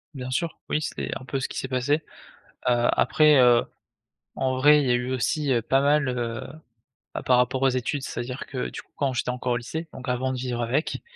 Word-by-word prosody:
Bien 130 -1 -5
sûr, 165 +5 -2
oui 155 - 0
c'est - - -4
un 130 - -12
peu 135 - -2
ce 130 - -2
qui - - -8
s'est 130 - -4
passé. 135 +4 0 0.7
Heu, 120 0 +3
après, 150 -1 +4
heu, 120 -1 +5 0.7
en 130 -1 0
vrai, 150 +2 +6
il 135 - -1
y - - +3
a - - +4
eu 125 +1 -1
aussi, 140 +2 0
heu, 120 - +2
pas 135 +4 +2
mal, 145 0 +3
heu, 120 -2 -3 0.7
bah, - - -4
par 125 - +4
rapport 125 +1 +1
aux 135 - +5
études. 130 +2 -1
C'est-à-dire 125 0 -5
que 130 -2 -4
du - - -7
coup, - - -22
quand 140 -2 0
j'étais 120 - -2
encore 125 0 -2
au 120 - +1
lycée, 160 +7 -6
donc 130 0 -9
avant 130 +1 0
de 130 - -4
vivre 125 -1 -3
avec, 130 +7 -1
130 Hz, 230 wpm, -25 LUFS, 125-140 Hz, 0.7 s, vrai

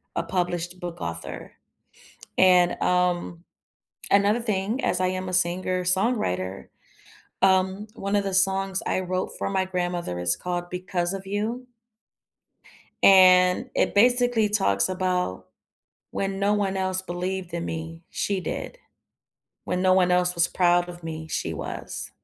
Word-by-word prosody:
a - - 0
published 175 -1 -2
book 175 -1 -6
author. 80 0 -6 0.9
And, 180 -1 +5
um, 180 -1 0 0.7
another 205 +4 +3
thing, 215 +2 -2
as 180 - +1
I 185 - +2
am 185 0 -3
a 185 - -6
singer-songwriter, 180 - 0 0.7
um, 190 +2 +2
one 200 +1 -2
of 205 - +2
the 195 -1 -3
songs 195 0 +1
I 185 - 0
wrote 185 0 -2
for - - -2
my 190 -1 0
grandmother 175 - -3
is 90 0 +1
called 175 0 -4
"Because 180 0 -2
of 195 0 -7
You" 225 +5 -3 1.4
and 185 +3 +6
it - - +1
basically 245 0 +3
talks 190 - +1
about 180 - -2 0.6
when 195 0 -3
no 200 +1 +2
one 195 -2 -1
else 185 0 -1
believed 180 0 -4
in 170 0 -3
me, 165 +1 -6
she 200 -2 -1
did. - - -5 0.9
When 180 +1 -1
no 185 - +4
one 185 -1 +3
else 180 0 +2
was 170 0 +2
proud 175 -1 +2
of 175 -1 -10
me, 160 -1 -6
she - - -3
was. - - -6
185 Hz, 140 wpm, -25 LUFS, 175-195 Hz, 1.4 s, and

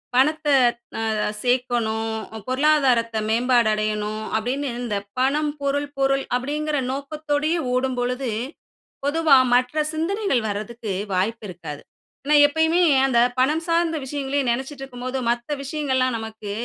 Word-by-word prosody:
பணத்த 305 +4 +2 0.6
அ - - 0 0.3
சேர்க்கணும், 240 -3 0 0.4
பொருளாதாரத்த 260 -4 +2
மேம்பாடு 240 0 +3
அடையணும் 215 0 -2
அப்டின்னு 260 +6 -1
இந்த 215 -4 -2 0.2
பணம், 295 +3 +2
பொருள், 285 +1 -1
பொருள் 275 0 +2
அப்படிங்கிற 295 +4 -2 0.2
நோக்கத்தோடைய 300 +3 -1 0.2
ஓடும்பொழுது, 250 0 -1 0.7
பொதுவா 300 0 +4 0.2
மற்ற 250 +5 +2
சிந்தனைகள் 330 - 0
வரதுக்கு 215 +1 -4 0.2
வாய்ப்பு 215 +5 -1
இருக்காது. 160 -5 -8 0.4
ஏன்னா, 300 +1 +4
எப்பயுமே 320 +4 +2 0.2
அந்த 250 -3 +2 0.2
பணம் 305 +5 +2
சார்ந்த 335 -1 +2
விஷயங்களையே 275 0 -2
நினைச்சிட்டு 265 +3 -3
இருக்கும்போது 255 0 -5
மத்த 240 +3 -2
விஷயங்கள்லாம் 260 -4 0
நமக்கு 220 -2 -7
260 Hz, 110 wpm, -23 LUFS, 235-295 Hz, 0.7 s, பொதுவா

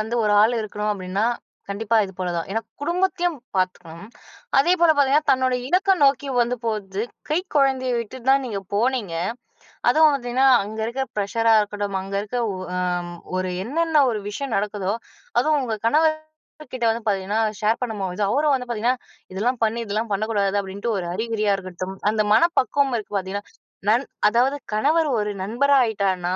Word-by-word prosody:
வந்து 220 +2 -3
ஒரு 210 - +2
ஆள் 225 +3 +3
இருக்கணும் 210 0 -3
அப்படின்னா, 190 +1 -2 0.4
கண்டிப்பா 220 +3 0
இது 190 - -8
போல 180 -1 -2
தான். 165 - -2
ஏனா, 225 - 0 0.2
குடும்பத்தையும் 350 +1 0 0.2
பார்த்துக்கணும். 185 0 -3 0.5
அதே 340 +6 +4
போல 340 -1 +6
பார்த்தீங்கன்னா, 285 +2 +3
தன்னுடைய 255 -1 +1
இலக்க 380 +4 +3
நோக்கி 280 0 +2
வந்து 240 +1 +1
போறது, 210 -3 -2 0.3
கை 305 - +3 0.2
குழந்தைய 265 -2 +2
விட்டுட்டு 240 +3 -6
தான் 275 0 +4
நீங்க 205 -5 -3
போனீங்க. 225 -4 0 0.8
அதுவும் 315 0 +6
பார்த்தீங்கன்னா, 255 0 +1 0.2
அங்க 215 +2 -7
இருக்கிற 260 +4 -2
ப்ரஷரா 225 +3 +2
இருக்கட்டும். 205 -1 -2
அங்க 195 +1 -6
இருக்கிற 240 +4 -3 0.4
அ - - 0 0.6
ஒரு 185 0 -2
என்னன்ன 315 +3 +2
ஒரு 215 - -3
விஷயம் 260 +4 -4
நடக்குதோ, 200 -1 -1 0.5
அதுவும் 300 +3 +2
உங்க 235 -4 -2
கணவர் 310 +6 +4 0.6
கிட்ட 245 -2 -1
வந்து 230 +1 -4
பார்த்தீங்கன்னா, 200 +1 0 0.2
ஷேர் 215 +2 +2
பண்ணு 235 -3 -2
போது 190 +1 -2
அவரும் 290 +3 +2
வந்து 250 -1 -5
பார்த்தீங்கன்னா, 240 +2 0 0.3
இதெல்லாம் 230 +6 -1
பண்ணு, 225 +1 +1
இதெல்லாம் 215 +2 -2
பண்ணக்கூடாது 205 -1 0
அப்படின்ட்டு 200 +4 -4
ஒரு 180 - -3
அறிகுறியா 215 0 0
இருக்கட்டும். 185 0 -6 0.2
அந்த 215 0 +1
மனப்பக்குவம் 280 0 +3
இருக்கு 215 -1 -8
பார்த்தீங்களா, 195 +1 -4 0.4
நண் 235 +6 +3 0.2
அதாவது 245 +6 +2 0.2
கணவர் 300 +10 +2
ஒரு 210 0 -1
நண்பரா 260 +8 +2
ஆயிட்டார்னா, 190 -5 0
225 Hz, 160 wpm, -23 LUFS, 200-265 Hz, 0.8 s, போல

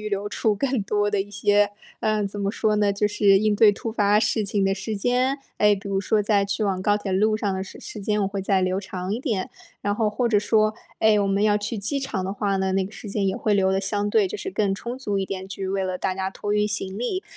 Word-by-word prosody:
预 215 - -4
留 200 0 -2
出 210 +1 0
更 255 +3 0
多 205 0 +1
的 205 -2 +1
一 205 - -5
些， 205 0 +2 0.3
嗯， 215 -1 +1
怎 200 +1 -6
么 200 - 0
说 215 0 0
呢， 205 -1 +2
就 210 +1 +1
是 205 -1 +4
应 215 0 +2
对 210 0 +6
突 220 +2 -5
发 210 -2 +3
事 220 0 +1
情 200 -1 0
的 195 - +2
时 205 +2 -4
间。 250 +5 +1 0.2
哎， 210 0 +5
比 200 0 -9
如 195 -1 0
说 210 +1 +1
在 200 -1 +2
去 200 +2 -1
往 190 -2 0
高 205 +2 +2
铁 200 -2 -4
路 215 +3 +2
上 205 -2 -1
的 190 0 -2
时 195 - -10
时 215 - -8
间， 210 +1 0
我 - - +1
会 195 0 -3
再 190 -1 +1
留 185 +1 0
长 185 -1 -5
一 225 - -2
点， 220 -9 -2 0.3
然 205 0 0
后 215 0 +1
或 225 +4 -1
者 220 -3 +3
说， 215 +1 +2 0.3
哎， 215 -1 +4
我 200 - +1
们 195 +1 +1
要 210 -1 +3
去 210 +2 -3
机 245 +8 -1
场 205 -8 -3
的 190 - -2
话 200 -1 -1
呢， 190 0 0
那 195 0 +2
个 190 - -6
时 215 - -10
间 200 -1 0
也 190 - -1
会 215 - 0
留 190 -1 +3
得 190 - +1
相 205 +1 -1
对 205 -1 +3
就 185 - -6
是 190 - -4
更 195 0 0
充 240 +5 -6
足 205 -7 -2
一 195 - -1
点， 190 -1 -5
去 195 0 -5
为 195 0 -1
了 185 -1 -3
大 185 - -1
家 190 0 -2
托 205 +1 -3
运 210 0 +2
行 200 -2 -3
李。 310 - -2
205 Hz, 300 characters per minute, -24 LUFS, 195-215 Hz, 0.3 s, 对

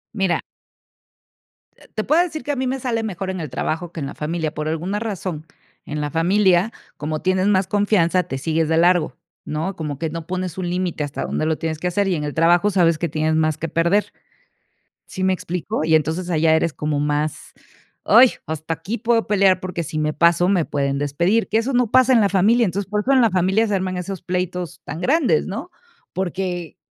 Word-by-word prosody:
Mira 190 -3 +1 1.3
eh, - - -20
te 215 - -2
puedo 315 +5 +3
decir 315 -3 -3
que 290 - -2
a - - -1
mí 260 0 -1
me 265 +1 -2
sale 230 -3 -1
mejor 195 -2 -4
en 185 -1 -3
el 155 -4 -5
trabajo 165 +6 -3
que 165 - -7
en 140 - -3
la - - -8
familia. 160 0 -3
Por 150 0 -4
alguna 175 +6 -2
razón, 185 -8 -4 0.4
en 150 0 -4
la 145 -1 -3
familia, 185 +4 +3 0.3
como 155 +1 -3
tienes 185 +1 +1
más 190 -2 +2
confianza, 190 -4 +2
te 135 - -5
sigues 160 +2 0
de 160 - +2
largo, 175 0 +3 0.3
¿no? 160 +6 -3
Como 150 -3 -4
que 165 -1 -2
no 165 0 -7
pones 185 -1 -4
un 180 -2 -2
límite 180 -4 -2
hasta 145 0 -4
dónde 155 - -2
lo 160 -1 0
tienes 160 -1 -3
que 180 - -2
hacer, 195 +3 0
y 180 - +1
en 150 - -3
el 145 - -3
trabajo 170 +4 +4
sabes 170 -4 +3
que 170 0 -2
tienes 155 +1 0
más 155 -1 +1
que 165 - -3
perder, 170 +6 +1 0.9
¿sí 190 -2 -5
me 190 0 +3
explico? 175 -3 -3
Y 160 0 +3
entonces 160 +4 -1
allá 160 -1 +3
eres 160 0 +1
como 150 -1 -2
más: 150 +1 -2 0.5
"Ay, 240 +4 +7
hasta 160 +1 -3
aquí 185 +8 -5
puedo 230 +1 +1
pelear, 195 -2 +3
porque 180 -2 -4
si 155 0 -4
me 155 0 0
paso, 170 +2 +3
me 185 -4 +3
pueden 140 -1 -1
despedir", 170 +10 +1
que 220 - +2
eso 250 +4 -1
no 245 -3 +2
pasa 255 0 +5
en 230 - +5
la 200 - +3
familia. 220 +5 +3
Entonces, 195 +2 -3
por 210 0 0
eso 265 - 0
en 260 - +5
la 225 -4 +3
familia 190 +5 +2
se 205 - 0
arman 185 -1 -2
esos 185 +1 -5
pleitos 180 -2 -3
tan 160 +3 -6
grandes, 290 - +2
¿no? - - -6 0.4
Porque, 180 -2 -3
180 Hz, 215 wpm, -21 LUFS, 160-200 Hz, 1.3 s, Ay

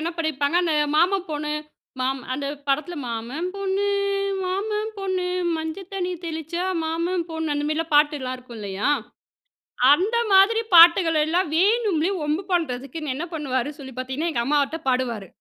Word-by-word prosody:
என்ன 330 +2 -2
பண்ணிருப்பாங்க, 315 -1 0
அந்த 325 -3 +1 0.2
மாமா 370 +4 +4
பொண்ணு 300 0 -2 0.5
மாம் 265 +1 0
அந்த 280 +2 -3 0.2
படத்தில 310 +6 0
"மாமன் 240 +8 -4
பொண்ணு, 395 0 -1 0.6
மாமன் 420 +4 -2
பொண்ணு 375 -2 -2 0.3
மஞ்சள் 320 +4 -5
தண்ணி 365 -2 -2
தெளிச்சா 325 +2 -4 0.2
மாமன் 335 +3 -1
பொண்ணு" 320 -2 -2
அந்தமாரிலாம் 305 +2 -2
பாட்டு 295 0 +5
எல்லாம் 255 -1 -4
இருக்கும் 250 -2 -12
இல்லயா! 200 +1 -2 1.1
அந்த 410 +9 +1
மாதிரி 400 +4 +6
பாட்டுகளெல்லாம் 335 -1 +6
வேணும்லே 395 -2 +2
ஒம்பு 305 +6 -1
பண்ணுறதுக்குன்னு 300 -2 -2
என்ன 310 +6 -3
பண்ணுவாரு 275 -4 -1
சொல்லி 265 -2 -9
பார்த்தீங்கன்னா, 260 +6 -2
எங்கம்மாட்ட 280 +5 +1
பாடுவாரு. 245 -6 0
320 Hz, 130 wpm, -23 LUFS, 275-360 Hz, 1.1 s, மாதிரி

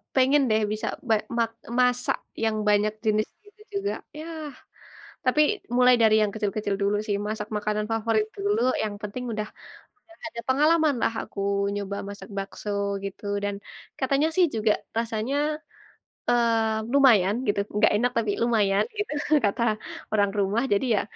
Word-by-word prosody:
pengen 270 +2 +5
deh, 220 0 +3
bisa 215 0 -3 0.2
be 220 - +6 0.2
mak 230 -1 +1 0.3
masak 250 0 +2 0.3
yang 220 -1 +1
banyak 210 +1 +3
jenis 215 0 +2 0.2
gitu 415 +1 -20 0.2
juga. 405 - -1 0.3
Yah, 315 -2 -6 0.7
tapi 255 +4 +4 0.4
mulai 250 0 +6
dari 220 -1 +6
yang 210 - +2
kecil-kecil 210 -1 -1
dulu 200 +1 +2
sih, 205 - +1
masak 210 -1 -3
makanan 210 0 -1
favorit 225 -1 +1
dulu 205 +2 0 0.2
yang 210 -1 -3
penting 210 +4 -5
udah 215 0 -3 0.5
udah 335 - -20 0.2
ada 235 - -5
pengalaman 305 +2 +4
lah - - +1
aku - - -10 0.3
nyoba 200 0 -3
masak 200 -1 -9
bakso 195 +1 -5 0.4
gitu, 195 +1 -7 0.2
dan 205 0 -1 0.4
katanya 275 +3 +2
sih, 370 - +5
juga 215 -1 +3 0.2
rasanya, 230 +3 -1 0.9
eee, 225 -2 +2
lumayan 220 -9 +5
gitu, 205 -1 +1 0.2
nggak - - +5
enak 245 +4 +2
tapi 220 -3 +1
lumayan 210 -4 +3
gitu 415 -4 -2 0.3
kata 205 +3 0 0.5
orang 205 -2 +3
rumah. 200 +4 +1
Jadi 200 +6 +1
ya, - - +2
220 Hz, 150 wpm, -26 LUFS, 205-250 Hz, 0.9 s, be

